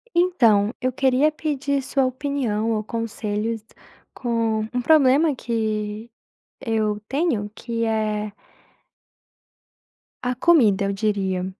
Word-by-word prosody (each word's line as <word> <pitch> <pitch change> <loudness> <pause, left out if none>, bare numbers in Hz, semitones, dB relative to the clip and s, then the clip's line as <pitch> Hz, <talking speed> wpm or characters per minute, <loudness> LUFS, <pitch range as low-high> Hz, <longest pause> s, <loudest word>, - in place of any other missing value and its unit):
Então, 235 - +3
eu 255 +1 0
queria 265 +3 +2
pedir 285 -3 -2
sua 270 0 0
opinião, 255 -5 -1
ou 215 -1 -1
conselhos, 220 0 -3 0.5
com 230 -3 -1
um 250 - 0
problema 290 +2 +4
que 220 -2 -3 0.5
eu 220 -4 -1
tenho, 270 -9 0
que 230 +1 -3
é 215 -1 -1 1.9
a 250 0 0
comida, 235 - +4
eu 200 - 0
diria, 195 -3 -1
230 Hz, 105 wpm, -23 LUFS, 210-270 Hz, 1.9 s, problema